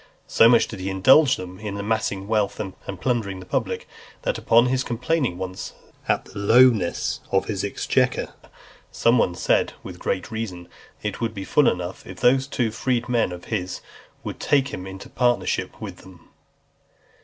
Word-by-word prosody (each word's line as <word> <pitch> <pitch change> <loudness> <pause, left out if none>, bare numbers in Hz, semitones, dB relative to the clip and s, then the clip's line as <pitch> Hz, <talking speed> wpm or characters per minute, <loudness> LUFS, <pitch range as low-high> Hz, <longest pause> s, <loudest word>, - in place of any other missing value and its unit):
So 115 - +5
much 115 -1 +5
did 110 - -8
he 95 +1 -3
indulge 130 +10 +5
them 90 0 -8
in 105 -2 -5
amassing 100 -2 -2
wealth, 105 -2 0
and 95 -3 -4 0.3
plundering 110 -6 -1
the 90 - -10
public, - - -2 0.4
that, - - -1
upon 115 +1 +4
his 130 +1 +1
complaining, 125 - -1
once, 95 0 -6 0.4
of - - +2
the - - -10
lowness 115 -3 +4
of - - +2
his - - -3
exchequer, - - 0 0.6
some 115 +1 +3
one 90 - +1
said, - - +1
with - - -9
great 95 - -2
reason, 95 -6 -5 0.4
that 105 - 0
"It 100 - -10
would 115 -1 -2
be 95 -1 -5
full 150 - +4
enough, 90 0 -4
if 95 - -9
those 130 +2 +3
two 120 -5 -1
freedmen 120 -2 0
of 90 0 -8
his 90 -3 -3 0.4
would - - -6
but - - -6
take 140 -1 +3
him 90 +1 -6
into 95 0 -9
partnership 120 -1 0
with - - -7
them." 90 -3 -16
110 Hz, 175 wpm, -23 LUFS, 95-120 Hz, 0.6 s, So